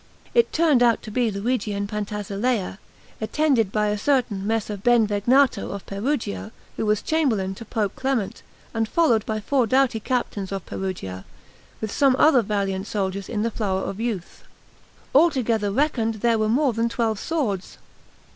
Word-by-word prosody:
It 475 -1 +3
turned 310 -6 +3
out 235 -2 +3
to 215 - -8
be 240 +1 +1
Luigi 215 +2 -1
and 200 0 -2
Pantasilea, 210 0 -2 0.4
attended 235 -3 +1
by 210 0 +1
a 210 0 -1
certain 220 -7 0
Messer 220 -1 -1
Benvegnato 235 +4 +3
of 200 - -6
Perugia, 215 0 -3 0.2
who 220 - -2
was 210 -1 +1
chamberlain 230 -12 +1
to 230 +4 -10
Pope 210 -3 -2
Clement, 260 -7 -2 0.3
and 225 -1 -1
followed 245 -11 +3
by 215 -1 -1
four 250 +2 +1
doughty 260 -1 +2
captains 215 -5 -2
of 195 -2 -4
Perugia, 95 - -5 0.6
with 215 -2 -3
some 270 +1 +3
other 275 -2 +5
valiant 195 -2 -2
soldiers 195 -2 -3
in 215 -3 -1
the 230 - 0
flower 195 -4 -1
of 195 - -5
youth; 220 -7 -4 0.7
altogether 250 -9 +3
reckoned, 230 -3 +1
there 230 +1 +1
were 215 0 +1
more 260 +2 +2
than 230 +1 0
twelve 225 -3 -1
swords. 235 - -2
220 Hz, 155 wpm, -23 LUFS, 200-250 Hz, 0.7 s, other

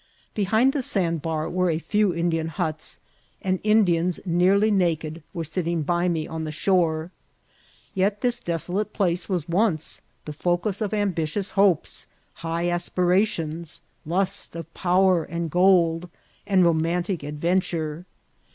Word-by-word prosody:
Behind 220 +6 +2
the 290 - 0
sandbar 165 - -1
were 180 0 0
a 160 - +1
few 205 +3 +1
Indian 165 -1 0
huts, 160 -1 -4 0.4
and 185 -1 -1
Indians 180 -5 +3
nearly 190 +5 +3
naked 165 -4 0
were 165 - -4
sitting 165 0 -2
by 175 +3 +1
me 160 -3 -1
on 160 0 -5
the 155 - -4
shore. 165 -1 +1 0.8
Yet 200 +2 0
this 245 -1 0
deso* 170 -1 -2
late 210 +2 -1
place 175 -2 0
was 180 -6 -1
once 175 -3 0 0.2
the 150 - -5
focus 175 +6 -1
of 210 - -1
ambitious 195 -2 -1
hopes, 195 -5 +2 0.3
high 165 +1 -1
aspirations, 175 -2 0 0.2
lust 190 +3 -1
of 165 0 -8
power 185 -1 +3
and 170 0 -4
gold, 175 -1 +3 0.4
and 190 -3 +4
romantic 170 +1 0
ad 150 +1 -6
venture. 170 -1 -1
175 Hz, 135 wpm, -24 LUFS, 165-190 Hz, 0.8 s, and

